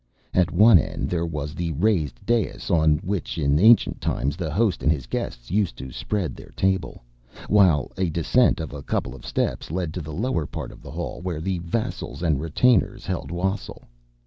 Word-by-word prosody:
At 90 Hz, -2 st, +3 dB
one 105 Hz, -3 st, +7 dB
end -, -, -3 dB
there 85 Hz, -1 st, 0 dB
was 75 Hz, -2 st, -4 dB
the 85 Hz, -1 st, -3 dB
raised 80 Hz, -, 0 dB
dais, 115 Hz, -4 st, 0 dB
on 80 Hz, -2 st, +4 dB
which 100 Hz, -3 st, -3 dB
in 70 Hz, -1 st, +2 dB
ancient 115 Hz, +5 st, +5 dB
times 70 Hz, +3 st, -1 dB
the 85 Hz, -3 st, -4 dB
host 100 Hz, +2 st, +1 dB
and 75 Hz, -, +3 dB
his 70 Hz, -6 st, -2 dB
guests -, -, -5 dB
used 95 Hz, -, 0 dB
to 65 Hz, 0 st, -7 dB
spread 90 Hz, -, -3 dB
their -, -, -12 dB
table, 95 Hz, -8 st, -1 dB, 0.4 s
while 90 Hz, -10 st, +4 dB
a 95 Hz, -2 st, +1 dB
descent 85 Hz, +8 st, +2 dB
of 80 Hz, -3 st, -5 dB
a 70 Hz, -, -6 dB
couple 65 Hz, -, -2 dB
of 65 Hz, -, -11 dB
steps -, -, -2 dB
led 85 Hz, -1 st, -2 dB
to 90 Hz, -, -4 dB
the 80 Hz, 0 st, -7 dB
lower 85 Hz, -, -1 dB
part -, -, -6 dB
of -, -, -14 dB
the -, -, -11 dB
hall, -, -, -5 dB
where 90 Hz, -4 st, -3 dB
the 90 Hz, +2 st, -2 dB
vassals 85 Hz, 0 st, -4 dB
and 75 Hz, -5 st, +1 dB
retainers 115 Hz, +10 st, +2 dB
held 70 Hz, -, -3 dB
wassail. 95 Hz, +4 st, -3 dB
85 Hz, 195 wpm, -24 LUFS, 75-95 Hz, 0.4 s, one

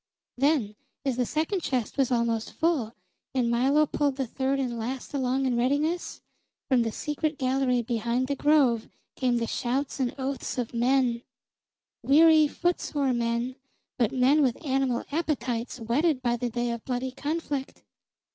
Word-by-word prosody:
Then, 270 Hz, -6 st, +1 dB, 0.3 s
as 260 Hz, -3 st, 0 dB
the 250 Hz, -2 st, +1 dB
second 320 Hz, +6 st, -1 dB
chest 255 Hz, -7 st, -2 dB
was 270 Hz, -2 st, +1 dB
almost 235 Hz, -2 st, 0 dB
full, 290 Hz, -9 st, 0 dB, 0.4 s
and 240 Hz, -2 st, +2 dB
Milo 270 Hz, +6 st, +3 dB
pulled 285 Hz, -2 st, 0 dB
the 270 Hz, -1 st, -1 dB
third 270 Hz, +3 st, -1 dB
and 245 Hz, -3 st, -2 dB
last 250 Hz, +5 st, -5 dB
along 265 Hz, -1 st, 0 dB
in 255 Hz, -2 st, +1 dB
readiness, 290 Hz, +8 st, 0 dB, 0.5 s
from 255 Hz, -3 st, +3 dB
the 225 Hz, -1 st, -1 dB
secret 300 Hz, +4 st, -2 dB
gallery 255 Hz, -2 st, +1 dB
behind 235 Hz, +2 st, -1 dB
the 280 Hz, +2 st, -2 dB
Grove 275 Hz, -6 st, +3 dB, 0.3 s
came 250 Hz, -2 st, +1 dB
the 230 Hz, -, 0 dB
shouts 265 Hz, +5 st, -2 dB
and 250 Hz, -2 st, -1 dB
oaths 270 Hz, 0 st, -3 dB
of 245 Hz, -2 st, -3 dB
men, 240 Hz, 0 st, +2 dB, 0.8 s
weary, 310 Hz, +2 st, +6 dB
footsore 290 Hz, -5 st, -1 dB
men, 235 Hz, +2 st, -1 dB, 0.4 s
but 230 Hz, -3 st, +2 dB
men 265 Hz, +4 st, +4 dB
with 265 Hz, +3 st, 0 dB
animal 265 Hz, -3 st, 0 dB
appetites 260 Hz, -7 st, -2 dB
whetted 255 Hz, +5 st, +1 dB
by 240 Hz, -1 st, +2 dB
the 240 Hz, +1 st, -2 dB
day 240 Hz, +1 st, -1 dB
of 235 Hz, -1 st, -5 dB
bloody 255 Hz, 0 st, -2 dB
conflict. 285 Hz, -1 st, -4 dB
260 Hz, 155 wpm, -27 LUFS, 240-285 Hz, 0.8 s, weary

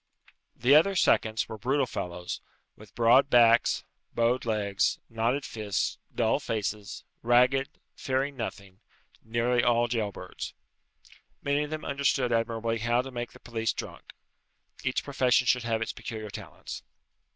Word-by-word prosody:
The 125 Hz, +4 st, +3 dB
other 165 Hz, +6 st, +6 dB
seconds 110 Hz, -10 st, +2 dB
were 110 Hz, -, -7 dB
brutal 135 Hz, +5 st, +1 dB
fellows, 90 Hz, -5 st, -5 dB, 0.3 s
with 105 Hz, 0 st, -16 dB
broad 120 Hz, +4 st, +5 dB
backs, 120 Hz, -1 st, +5 dB, 0.3 s
bowed 120 Hz, +2 st, +2 dB
legs, 105 Hz, -3 st, +1 dB
knotted 115 Hz, +5 st, 0 dB
fists, 105 Hz, -3 st, -2 dB, 0.2 s
dull -, -, +2 dB
faces; 105 Hz, -1 st, -4 dB, 0.2 s
ragged, 125 Hz, +3 st, +3 dB, 0.2 s
fearing 135 Hz, +2 st, -1 dB
nothing, 100 Hz, -5 st, -6 dB, 0.4 s
nearly 120 Hz, +2 st, +1 dB
all 120 Hz, 0 st, +3 dB
jail 110 Hz, -3 st, -1 dB
birds. -, -, -8 dB, 0.9 s
Many 140 Hz, +1 st, +1 dB
of -, -, -9 dB
them 155 Hz, 0 st, -5 dB
understood 135 Hz, -3 st, +1 dB
admirably 115 Hz, 0 st, 0 dB
how 120 Hz, +2 st, +1 dB
to 135 Hz, -, -8 dB
make 120 Hz, -1 st, -5 dB
the -, -, -14 dB
police 115 Hz, -1 st, -2 dB
drunk. -, -, -8 dB, 0.7 s
Each 130 Hz, 0 st, 0 dB
profession 130 Hz, -3 st, +2 dB
should 125 Hz, -1 st, +2 dB
have 115 Hz, -1 st, 0 dB
its -, -, -5 dB
peculiar 110 Hz, -2 st, -7 dB
talents. -, -, -8 dB
120 Hz, 140 wpm, -28 LUFS, 110-130 Hz, 0.9 s, other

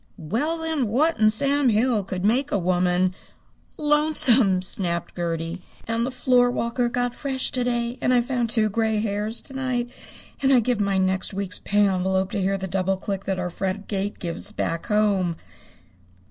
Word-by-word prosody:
"Well, 230 Hz, -, -2 dB
then, 320 Hz, -6 st, -1 dB
what 300 Hz, +10 st, +1 dB
in 215 Hz, 0 st, +5 dB
Sam 280 Hz, +4 st, +2 dB
Hill 225 Hz, -1 st, +2 dB
could 185 Hz, 0 st, -4 dB
make 255 Hz, +7 st, +2 dB
a -, -, +2 dB
woman 180 Hz, 0 st, +1 dB, 0.3 s
" -, -, -36 dB, 0.2 s
"Lonesome!" 250 Hz, -11 st, +3 dB
snapped 175 Hz, -2 st, -1 dB
Gertie. 170 Hz, 0 st, -3 dB, 0.3 s
"And 230 Hz, +1 st, 0 dB
the -, -, -2 dB
floorwalker 245 Hz, -1 st, +1 dB
got 245 Hz, 0 st, -1 dB
fresh 265 Hz, -1 st, -2 dB
to 255 Hz, -3 st, 0 dB
day. 240 Hz, 0 st, -2 dB
And -, -, +2 dB
I 245 Hz, -1 st, +4 dB
found 245 Hz, -1 st, -1 dB
two 220 Hz, -1 st, +2 dB
gray 220 Hz, +1 st, 0 dB
hairs 210 Hz, +1 st, -2 dB
to 270 Hz, -, -10 dB
night. 250 Hz, -2 st, -2 dB, 0.5 s
And 270 Hz, 0 st, +3 dB
I'd 250 Hz, -4 st, +5 dB
give 245 Hz, -1 st, 0 dB
my 200 Hz, -1 st, +1 dB
next 190 Hz, +1 st, 0 dB
week's 195 Hz, 0 st, -1 dB
pay 205 Hz, 0 st, +2 dB
envelope 190 Hz, 0 st, 0 dB
to 200 Hz, -, -1 dB
hear 195 Hz, +1 st, 0 dB
the 190 Hz, -, -5 dB
double 190 Hz, +1 st, 0 dB
click 195 Hz, 0 st, -4 dB
that 190 Hz, -1 st, -1 dB
our 180 Hz, -1 st, -3 dB
front 195 Hz, +3 st, -3 dB
gate 200 Hz, 0 st, -3 dB
gives 175 Hz, +4 st, -3 dB
back 165 Hz, -5 st, -3 dB
home." 205 Hz, -5 st, +1 dB
210 Hz, 180 wpm, -24 LUFS, 190-245 Hz, 0.5 s, in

